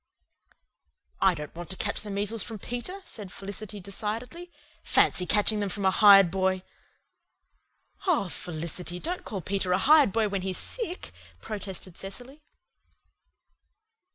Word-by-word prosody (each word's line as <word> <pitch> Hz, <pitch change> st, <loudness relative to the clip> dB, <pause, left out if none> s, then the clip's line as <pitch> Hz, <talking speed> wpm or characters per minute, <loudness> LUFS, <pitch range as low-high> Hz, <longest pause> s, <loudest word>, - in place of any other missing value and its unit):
"I 190 Hz, -2 st, +5 dB
don't 150 Hz, -2 st, -7 dB
want 175 Hz, 0 st, -8 dB
to 190 Hz, -, -4 dB
catch 205 Hz, -, -2 dB
the 210 Hz, -, -8 dB
measles 205 Hz, +2 st, +1 dB
from 225 Hz, -, -4 dB
Peter," 245 Hz, -, -6 dB
said 205 Hz, -4 st, -8 dB
Felicity 200 Hz, +1 st, -6 dB
decidedly. 225 Hz, -, -5 dB, 0.3 s
"Fancy 180 Hz, -, +3 dB
catching 210 Hz, 0 st, +2 dB
them 205 Hz, -1 st, -1 dB
from 200 Hz, +1 st, -3 dB
a 190 Hz, -, +5 dB
hired 195 Hz, -3 st, +8 dB
boy!" 190 Hz, 0 st, +1 dB, 1.4 s
"Oh, 310 Hz, -, +3 dB
Felicity, 175 Hz, +1 st, -5 dB
don't 355 Hz, -, -2 dB
call 195 Hz, -3 st, -5 dB
Peter 185 Hz, +1 st, 0 dB
a -, -, +4 dB
hired 290 Hz, +2 st, +6 dB
boy 220 Hz, 0 st, +2 dB
when 200 Hz, -2 st, -2 dB
he's 185 Hz, -1 st, -2 dB
sick," 415 Hz, -7 st, -4 dB, 0.3 s
protested 195 Hz, -4 st, -6 dB
Cecily. 245 Hz, +9 st, -7 dB
200 Hz, 135 wpm, -28 LUFS, 185-225 Hz, 1.4 s, hired